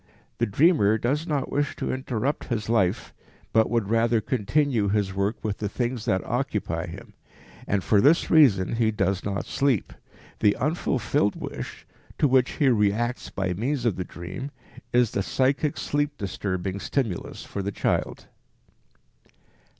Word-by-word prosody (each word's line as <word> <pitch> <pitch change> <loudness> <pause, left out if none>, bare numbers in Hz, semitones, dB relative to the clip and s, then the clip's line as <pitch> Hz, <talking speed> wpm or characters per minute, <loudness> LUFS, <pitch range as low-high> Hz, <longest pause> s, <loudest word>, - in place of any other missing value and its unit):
The 120 - +2
dreamer 110 - +4
does 140 +9 -1
not 145 -4 -1
wish 145 0 0
to - - -2
interrupt 130 +1 -2
his 110 -3 -3
life, 105 -2 +1 0.4
but 110 0 +4
would 115 -3 0
rather 115 0 +3
continue 120 0 +1
his 100 -2 0
work 100 +3 0
with 105 -2 -2
the 105 - -2
things 120 +1 -2
that 95 - +1
occupy - - -2
him, - - -10 0.5
and 100 -2 0
for 100 +5 +4
this 155 +7 +4
reason 115 - +5
he 115 -2 +3
does 95 -3 0
not 100 0 -2
sleep. 135 -7 0 0.5
The 105 - +4
unfulfilled 125 - 0
wish, - - -7 0.3
to 145 - +3
which 130 -1 +3
he 145 - +2
reacts 115 +2 +1
by 95 -2 -2
means 120 +7 -2
of 110 -6 +2
the 90 - -3
dream, 90 +12 -7 0.4
is 120 -2 +3
the 100 - -1
psychic 135 +7 0
sleep 145 0 -1
disturbing 95 -1 -3
stimulus 110 -6 -3
for 100 - -4
the 100 +1 -3
child. - - -1
115 Hz, 150 wpm, -25 LUFS, 100-135 Hz, 0.5 s, reason